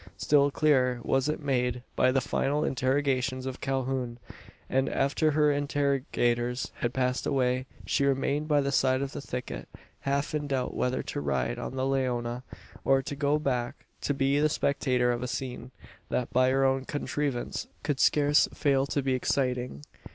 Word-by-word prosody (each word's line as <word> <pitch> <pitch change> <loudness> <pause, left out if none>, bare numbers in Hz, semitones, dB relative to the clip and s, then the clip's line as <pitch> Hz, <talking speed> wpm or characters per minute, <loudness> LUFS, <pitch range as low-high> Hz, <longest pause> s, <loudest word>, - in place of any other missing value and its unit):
Still 145 -1 +4
clearer 130 -4 +2
was 135 +2 +1
it 150 0 -3
made 125 -3 0
by 130 - +4
the 135 0 +2
final 145 +3 0
interrogations 130 0 0
of 130 0 -5
Calhoun; 130 -2 -2 0.5
and, 135 +1 +1
after 140 +3 +1
her 150 0 +3
interrogators 135 -4 0
had 120 - 0
passed 125 0 0
away, 130 -1 +1 0.2
she 140 - +1
remained 140 +2 0
by 145 -2 +3
the 140 0 -1
side 130 -1 +2
of 140 - -4
the - - -6
thicket 125 -2 -6 0.3
half 140 +2 -1
in 150 -1 -1
doubt 130 -3 -1
whether 125 +1 -1
to - - -4
ride 65 -3 -1
on - - -4
to - - -7
the 130 - 0
Leona, 125 -3 -1 0.4
or 135 0 +3
go 145 +2 0
back 125 -5 -2 0.2
and 145 - +1
be 135 +1 +2
the 155 +1 +3
spectator 130 -4 +1
of 120 0 -2
a 125 - -2
scene, 125 0 -5 0.4
that, 125 - -2
by 130 +1 +4
her 135 +1 +3
own 135 0 +2
contrivance, 145 -2 -3 0.2
could 145 -2 -1
scarce 145 0 +4
fail 140 -2 +2
to 140 0 -1
be 135 -1 +1
exciting. 125 - -1
135 Hz, 170 wpm, -28 LUFS, 125-140 Hz, 0.5 s, Still